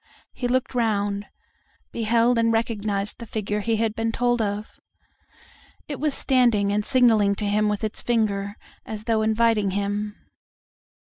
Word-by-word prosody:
He 245 Hz, -, -3 dB
looked 255 Hz, +1 st, 0 dB
round, 205 Hz, -4 st, 0 dB, 0.6 s
beheld 230 Hz, +1 st, +2 dB
and 230 Hz, 0 st, +3 dB
recognized 215 Hz, -3 st, -1 dB
the 235 Hz, -, -8 dB
figure 210 Hz, -1 st, -2 dB
he 225 Hz, +2 st, 0 dB
had 220 Hz, 0 st, 0 dB
been 225 Hz, +1 st, -1 dB
told 240 Hz, 0 st, +1 dB
of. 210 Hz, 0 st, -4 dB, 1.1 s
It 285 Hz, -3 st, -5 dB
was 295 Hz, 0 st, 0 dB
standing 235 Hz, -7 st, +3 dB
and 210 Hz, 0 st, +1 dB
signaling 220 Hz, -5 st, +4 dB
to 210 Hz, -, -2 dB
him 210 Hz, +1 st, +2 dB
with 210 Hz, +1 st, -2 dB
its 215 Hz, 0 st, -2 dB
finger, 205 Hz, -4 st, 0 dB, 0.3 s
as 215 Hz, -1 st, -7 dB
though 225 Hz, -1 st, +1 dB
inviting 220 Hz, -1 st, +2 dB
him. 205 Hz, +2 st, -2 dB
220 Hz, 145 wpm, -24 LUFS, 205-235 Hz, 1.1 s, signaling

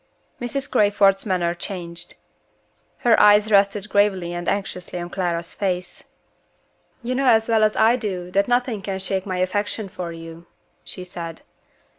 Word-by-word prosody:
Mrs. 265 Hz, +3 st, -2 dB
Crayford's 205 Hz, -1 st, +3 dB
manner 175 Hz, -3 st, +1 dB
changed. 175 Hz, -2 st, -7 dB, 0.9 s
Her 235 Hz, -2 st, +5 dB
eyes 210 Hz, +1 st, +6 dB
rested 200 Hz, 0 st, +3 dB
gravely 195 Hz, -4 st, +1 dB
and 175 Hz, 0 st, -2 dB
anxiously 180 Hz, -3 st, -3 dB
on 175 Hz, 0 st, -5 dB
Clara's 170 Hz, -3 st, -2 dB
face. 180 Hz, -3 st, -3 dB, 1.0 s
"You 245 Hz, +2 st, -2 dB
know 265 Hz, +1 st, 0 dB
as 225 Hz, -2 st, +4 dB
well 225 Hz, -2 st, +3 dB
as 215 Hz, 0 st, +3 dB
I 230 Hz, +3 st, +4 dB
do 185 Hz, -6 st, -4 dB
that 200 Hz, +1 st, +2 dB
nothing 245 Hz, -3 st, 0 dB
can 195 Hz, 0 st, -3 dB
shake 190 Hz, 0 st, -3 dB
my 185 Hz, -1 st, -2 dB
affection 205 Hz, +3 st, -1 dB
for 180 Hz, -2 st, -6 dB
you," 165 Hz, +1 st, -10 dB, 0.4 s
she 185 Hz, -, -6 dB
said. 170 Hz, -2 st, -8 dB
195 Hz, 150 wpm, -22 LUFS, 175-210 Hz, 1.0 s, eyes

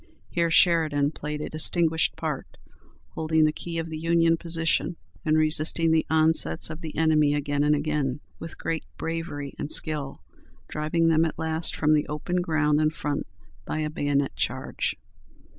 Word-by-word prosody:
Here 170 Hz, -1 st, +1 dB
Sheridan 155 Hz, -4 st, +3 dB
played 150 Hz, -1 st, -5 dB
"a -, -, -4 dB
distinguished 160 Hz, +1 st, +2 dB
part, -, -, -5 dB, 0.5 s
holding 160 Hz, 0 st, +1 dB
the 155 Hz, -, +3 dB
key 170 Hz, +1 st, -6 dB
of 165 Hz, 0 st, -3 dB
the 155 Hz, -, -4 dB
Union 165 Hz, 0 st, +3 dB
position, 165 Hz, +1 st, -1 dB, 0.3 s
and 155 Hz, 0 st, +2 dB
resisting 155 Hz, +1 st, +3 dB
the 160 Hz, -1 st, +2 dB
onsets 160 Hz, -, +2 dB
of 155 Hz, +2 st, -8 dB
the 160 Hz, -2 st, -7 dB
enemy 155 Hz, -2 st, +3 dB
again 145 Hz, 0 st, 0 dB
and 150 Hz, 0 st, +3 dB
again, 145 Hz, -3 st, -1 dB, 0.2 s
with 165 Hz, -, -8 dB
great 165 Hz, -1 st, -3 dB
bravery 165 Hz, -4 st, -4 dB
and 145 Hz, -, -4 dB
skill, 150 Hz, -4 st, -1 dB, 0.4 s
driving 165 Hz, +2 st, 0 dB
them 160 Hz, 0 st, +4 dB
at 160 Hz, -, -2 dB
last 160 Hz, 0 st, -1 dB
from 155 Hz, 0 st, +2 dB
the 150 Hz, -1 st, +2 dB
open 150 Hz, +4 st, -3 dB
ground 155 Hz, -3 st, +1 dB
in 155 Hz, -, +3 dB
front 145 Hz, -2 st, -3 dB, 0.4 s
by -, -, -4 dB
a 155 Hz, -1 st, -2 dB
bayonet 145 Hz, -2 st, 0 dB
charge. -, -, -2 dB
155 Hz, 160 wpm, -26 LUFS, 150-165 Hz, 0.5 s, them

